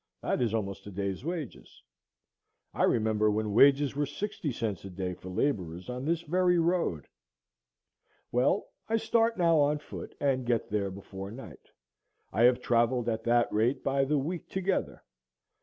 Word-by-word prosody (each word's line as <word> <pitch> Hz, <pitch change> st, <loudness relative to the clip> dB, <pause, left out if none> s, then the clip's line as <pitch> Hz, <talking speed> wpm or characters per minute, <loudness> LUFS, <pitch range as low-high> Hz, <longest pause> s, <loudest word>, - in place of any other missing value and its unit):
That -, -, 0 dB
is 120 Hz, -3 st, +1 dB
almost 105 Hz, -3 st, -3 dB
a -, -, -7 dB
day's 100 Hz, +2 st, -3 dB
wages. 165 Hz, -5 st, -6 dB, 0.9 s
I -, -, +2 dB
remember 110 Hz, -1 st, +2 dB
when 105 Hz, 0 st, -1 dB
wages 140 Hz, +4 st, +5 dB
were 145 Hz, 0 st, 0 dB
sixty 165 Hz, -1 st, -4 dB
cents 110 Hz, -7 st, -3 dB
a 100 Hz, -, -7 dB
day 90 Hz, 0 st, -4 dB
for 90 Hz, +1 st, -10 dB
laborers 90 Hz, -, -2 dB
on 125 Hz, +2 st, -5 dB
this 165 Hz, +1 st, 0 dB
very 180 Hz, +2 st, +2 dB
road. 165 Hz, -, +1 dB, 1.3 s
Well, 125 Hz, +11 st, +1 dB, 0.2 s
I 225 Hz, -, +3 dB
start 230 Hz, +1 st, +2 dB
now 165 Hz, -3 st, +4 dB
on 145 Hz, +1 st, +3 dB
foot, 150 Hz, -, -9 dB
and 135 Hz, -2 st, +1 dB
get 120 Hz, -4 st, -1 dB
there 100 Hz, -2 st, 0 dB
before 95 Hz, 0 st, -8 dB
night; 105 Hz, -, -11 dB, 0.6 s
I 115 Hz, -, +4 dB
have 125 Hz, 0 st, +4 dB
travelled 120 Hz, 0 st, +2 dB
at 110 Hz, 0 st, -2 dB
that 120 Hz, 0 st, +2 dB
rate 115 Hz, +5 st, +1 dB
by 135 Hz, 0 st, +2 dB
the 150 Hz, +2 st, +1 dB
week 160 Hz, +5 st, -3 dB
together. 190 Hz, 0 st, -2 dB
125 Hz, 160 wpm, -29 LUFS, 105-150 Hz, 1.3 s, wages